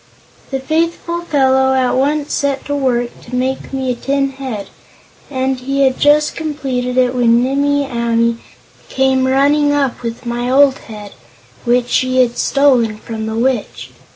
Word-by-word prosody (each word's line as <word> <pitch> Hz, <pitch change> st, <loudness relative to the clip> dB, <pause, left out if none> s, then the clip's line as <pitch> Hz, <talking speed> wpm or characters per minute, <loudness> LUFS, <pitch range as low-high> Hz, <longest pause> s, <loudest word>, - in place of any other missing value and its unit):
The 270 Hz, -, -2 dB
faithful 335 Hz, +4 st, -1 dB
fellow 265 Hz, -4 st, +2 dB
at 255 Hz, -1 st, +2 dB
once 290 Hz, +3 st, 0 dB
set 280 Hz, -1 st, -1 dB
to 285 Hz, -, -2 dB
work 245 Hz, -3 st, -1 dB
to 250 Hz, -, -6 dB
make 260 Hz, +1 st, -2 dB
me 265 Hz, -1 st, -2 dB
a -, -, -2 dB
tin 275 Hz, +2 st, -1 dB
head, 260 Hz, -7 st, -6 dB, 0.6 s
and 265 Hz, -1 st, -1 dB
he 275 Hz, +2 st, 0 dB
had 260 Hz, -1 st, +1 dB
just 300 Hz, +1 st, +3 dB
completed 265 Hz, -5 st, -3 dB
it 250 Hz, -1 st, +3 dB
when 240 Hz, -1 st, +3 dB
Nimmie 285 Hz, +2 st, +1 dB
Amee 235 Hz, -2 st, 0 dB, 0.5 s
came 265 Hz, -1 st, +1 dB
running 290 Hz, +2 st, +3 dB
up 275 Hz, -3 st, -1 dB
with 235 Hz, +1 st, -6 dB
my 240 Hz, +1 st, -2 dB
old 275 Hz, +1 st, +4 dB
head, 210 Hz, -2 st, -10 dB, 0.5 s
which 245 Hz, 0 st, +2 dB
she 255 Hz, +1 st, +1 dB
had 240 Hz, -1 st, -3 dB
stolen 255 Hz, -6 st, +2 dB
from 220 Hz, 0 st, -6 dB
the 220 Hz, -, -3 dB
Witch. 245 Hz, -1 st, -2 dB
265 Hz, 155 wpm, -16 LUFS, 245-280 Hz, 0.6 s, old